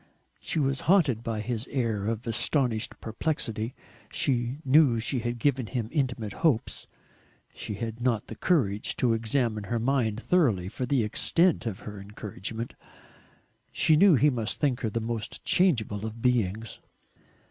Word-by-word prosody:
She -, -, -4 dB
was 135 Hz, -2 st, +1 dB
haunted 150 Hz, -, +4 dB
by 115 Hz, -2 st, -3 dB
his 120 Hz, +2 st, -4 dB
air 115 Hz, -6 st, -1 dB
of 115 Hz, +1 st, -2 dB
astonished 115 Hz, -1 st, 0 dB
perplexity. 115 Hz, -2 st, -2 dB, 0.4 s
She 125 Hz, -1 st, 0 dB
knew 135 Hz, -3 st, +5 dB
she 125 Hz, +3 st, -1 dB
had 120 Hz, +1 st, -3 dB
given 130 Hz, -1 st, 0 dB
him 115 Hz, -3 st, -3 dB
intimate 125 Hz, -, -1 dB
hopes, 140 Hz, -9 st, 0 dB, 0.7 s
she 105 Hz, -, -6 dB
had 115 Hz, +2 st, -5 dB
not 120 Hz, -3 st, 0 dB
the -, -, -8 dB
courage 105 Hz, -, +1 dB
to 120 Hz, -2 st, +2 dB
examine 115 Hz, -2 st, -1 dB
her 120 Hz, +4 st, -1 dB
mind 115 Hz, -3 st, 0 dB
thoroughly 120 Hz, -, +1 dB
for 125 Hz, +5 st, -4 dB
the 130 Hz, -3 st, +2 dB
extent 165 Hz, -, +3 dB
of 100 Hz, -4 st, -5 dB
her 105 Hz, -1 st, -8 dB
encouragement. 105 Hz, +2 st, -6 dB, 1.0 s
She 155 Hz, -, +4 dB
knew 185 Hz, +1 st, +6 dB
he 145 Hz, +3 st, +4 dB
must 115 Hz, -4 st, -3 dB
think 135 Hz, -4 st, +1 dB
her 110 Hz, -, 0 dB
the 115 Hz, -, -2 dB
most 115 Hz, -1 st, -4 dB
changeable 115 Hz, -, +2 dB
of 110 Hz, +1 st, -8 dB
beings. 115 Hz, -3 st, 0 dB
115 Hz, 150 wpm, -27 LUFS, 110-135 Hz, 1.0 s, knew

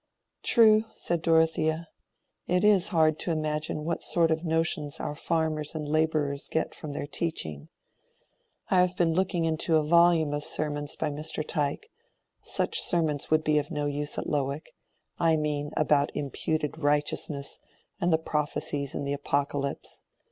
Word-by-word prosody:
"True," 220 Hz, -2 st, +5 dB
said 170 Hz, -1 st, -2 dB
Dorothea. 160 Hz, 0 st, +2 dB, 0.6 s
"It 180 Hz, +2 st, +2 dB
is 205 Hz, -4 st, +5 dB
hard 160 Hz, -4 st, +2 dB
to -, -, -3 dB
imagine 155 Hz, -1 st, -1 dB
what 170 Hz, 0 st, -2 dB
sort 165 Hz, -1 st, +2 dB
of 160 Hz, +1 st, 0 dB
notions 160 Hz, -3 st, -1 dB
our 150 Hz, -, -3 dB
farmers 155 Hz, 0 st, -1 dB
and 150 Hz, -2 st, -4 dB
laborers 150 Hz, -2 st, 0 dB
get 160 Hz, -, -1 dB
from 150 Hz, -3 st, -7 dB
their 145 Hz, -, -3 dB
teaching. 145 Hz, -, -3 dB, 1.0 s
I 185 Hz, -, +6 dB
have 180 Hz, 0 st, 0 dB
been 165 Hz, -2 st, +2 dB
looking 180 Hz, -1 st, +1 dB
into 160 Hz, +1 st, +1 dB
a 155 Hz, -, +4 dB
volume 170 Hz, -1 st, +4 dB
of 145 Hz, 0 st, -2 dB
sermons 145 Hz, -1 st, -3 dB
by 155 Hz, -2 st, -2 dB
Mr. 155 Hz, +1 st, -4 dB
Tyke: 145 Hz, -2 st, -2 dB, 0.5 s
such -, -, 0 dB
sermons 155 Hz, -5 st, 0 dB
would 155 Hz, 0 st, +3 dB
be 150 Hz, -1 st, +3 dB
of 145 Hz, -, -5 dB
no 150 Hz, -3 st, -2 dB
use 145 Hz, 0 st, -3 dB
at -, -, -2 dB
Lowick—I 150 Hz, +3 st, -2 dB
mean, 150 Hz, -1 st, -1 dB
about 150 Hz, -2 st, +3 dB
imputed 150 Hz, +2 st, -2 dB
righteousness 145 Hz, -1 st, -1 dB, 0.4 s
and 175 Hz, +1 st, +1 dB
the 160 Hz, -, +5 dB
prophecies 145 Hz, -2 st, -2 dB
in -, -, -2 dB
the 140 Hz, 0 st, -1 dB
Apocalypse. 140 Hz, 0 st, -2 dB
155 Hz, 150 wpm, -28 LUFS, 145-165 Hz, 1.0 s, I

